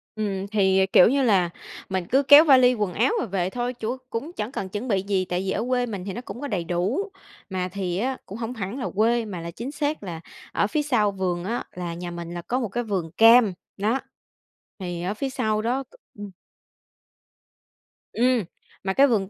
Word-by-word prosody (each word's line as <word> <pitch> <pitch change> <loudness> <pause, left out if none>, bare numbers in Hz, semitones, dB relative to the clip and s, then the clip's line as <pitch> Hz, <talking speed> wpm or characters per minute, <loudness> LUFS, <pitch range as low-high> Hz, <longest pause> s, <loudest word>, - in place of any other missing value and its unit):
Ừm, 200 -3 -2
thì, 195 -2 +3
ờ, 190 - +4
kiểu 180 - +8
như 275 +1 +2
là, 190 -7 +3 0.4
mình 185 -2 -1
cứ 270 +3 +3
kéo 290 +2 +9
vali 255 -3 +6
quần 210 -6 -2
áo 235 +8 +2
và - - -1
về 185 -3 -1
thôi, 245 +3 -3
chủ 240 +1 -4
cũng 280 +9 -4
chẳng 210 +3 -3
cần 195 -8 -4
chuẩn 210 +6 -4
bị 200 -5 +1
gì 195 -1 0
tại 180 0 -2
vì 190 - -2
ở 220 - -1
quê 250 -1 +2
mình 200 -6 -6
thì 195 - -4
nó 240 - -5
cũng 245 - -8
có 285 - -3
đầy 190 -9 -2
đủ. 190 - -1 0.4
Mà 185 -1 -2
thì 185 -3 -2
á 255 +5 -1
cũng 200 - -8
hổng 230 +1 -4
hẳn 220 +3 -5
là 250 - -2
quê 230 +2 +2
mà 185 -5 -6
là 170 - -6
chính 235 +10 -6
xác 295 -4 -2
là 170 -4 -6 0.3
ở 205 - +1
phía 300 +6 0
sau 240 -8 +2
vườn 180 -3 -2
á 230 +6 -2
là 175 -1 -5
nhà 175 +1 -6
mình 170 0 -6
là 175 - -5
có 250 +8 -2
một 230 - -2
cái 240 +5 -2
vườn 190 -7 -3
cam, 225 +2 +6 0.2
đó. 220 +7 +1 0.8
Thì 175 -2 -4
ở 190 +3 -1
phía 270 +5 -3
sau 220 -5 0
đó 250 +5 -1
c - - -33 0.3
ưm. 205 -1 -7 1.8
Ừm, 245 -1 +2 0.4
mà 190 0 0
cái 275 +7 +6
vườn 205 -7 +1
210 Hz, 225 wpm, -24 LUFS, 185-245 Hz, 1.8 s, kéo